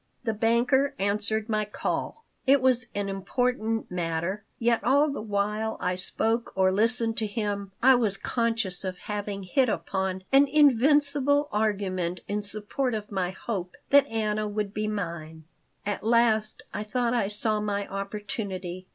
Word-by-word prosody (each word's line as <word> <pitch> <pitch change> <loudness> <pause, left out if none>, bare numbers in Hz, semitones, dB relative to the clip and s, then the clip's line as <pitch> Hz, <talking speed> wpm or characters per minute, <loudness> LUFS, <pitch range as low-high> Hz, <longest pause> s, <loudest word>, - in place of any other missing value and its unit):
The 225 -2 -1
banker 245 +6 +2
answered 210 +2 0
my 215 -2 0
call. 210 - -4 0.2
It 275 +1 +6
was 250 -2 +4
an 200 -1 -1
important 225 +3 -1
matter, 175 +3 -2
yet 230 -2 +1
all 285 +5 +3
the 275 - -4
while 210 +1 -1
I 180 - 0
spoke 225 +5 0
or 190 -1 +3
listened 225 +3 +1
to 220 - 0
him 205 -2 -3
I 265 +1 +8
was 220 -6 +2
conscious 225 -6 -1
of 185 -1 -4
having 205 -1 -5
hit 250 +7 +2
upon 190 -3 -2
an 275 +1 +6
invincible 285 +1 +4
argument 195 -4 -1
in 205 +1 -1
support 215 +5 -2
of 210 -1 -6
my 185 -3 -1
hope 185 -2 -5 0.2
that 280 0 +6
Anna 215 -2 -1
would 205 -1 -3
be 215 0 -2
mine 165 -6 -5 0.4
At 205 -1 -2
last 220 -1 +2
I 205 - -3
thought 235 +2 -1
I 235 -5 +1
saw 210 +1 0
my 205 -1 -2
opportunity. 195 -2 -5
215 Hz, 150 wpm, -27 LUFS, 195-235 Hz, 0.4 s, I